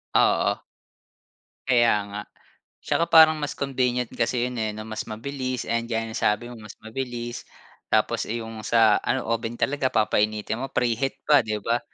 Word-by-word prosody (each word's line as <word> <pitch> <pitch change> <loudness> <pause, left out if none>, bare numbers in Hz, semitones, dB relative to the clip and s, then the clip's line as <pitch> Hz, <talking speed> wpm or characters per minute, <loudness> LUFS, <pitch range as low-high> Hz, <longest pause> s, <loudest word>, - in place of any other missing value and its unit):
Oo. - - +3 1.1
Kaya 120 -2 +4 0.2
nga. 105 +1 -4 0.6
Tsaka 170 - +1
parang 160 -1 +8
mas 145 -1 -3
convenient 125 -3 0
kasi 120 +1 0
yun 125 - -6
eh 110 -1 -1
'no, 110 - -6
mas 110 -1 -4
mabilis. 130 +3 -4
And 115 0 -1
gaya 115 -1 -1
ng 110 - -7
sabi 105 +3 +1
mo, - - -9
mas 105 -1 -11
mabilis 120 +1 -5 0.5
tapos, - - +1
eh 115 - -1
yung 110 -1 -8
sa 110 -1 +4
ano, 130 - -1
oven 115 +1 -2
talaga 135 0 0
papainitin 105 +1 0
mo, 135 - -4
preheat 125 +3 0
pa, 145 -2 +6
'di 110 -1 -3
ba? 120 +1 +1
120 Hz, 165 wpm, -25 LUFS, 110-130 Hz, 1.1 s, parang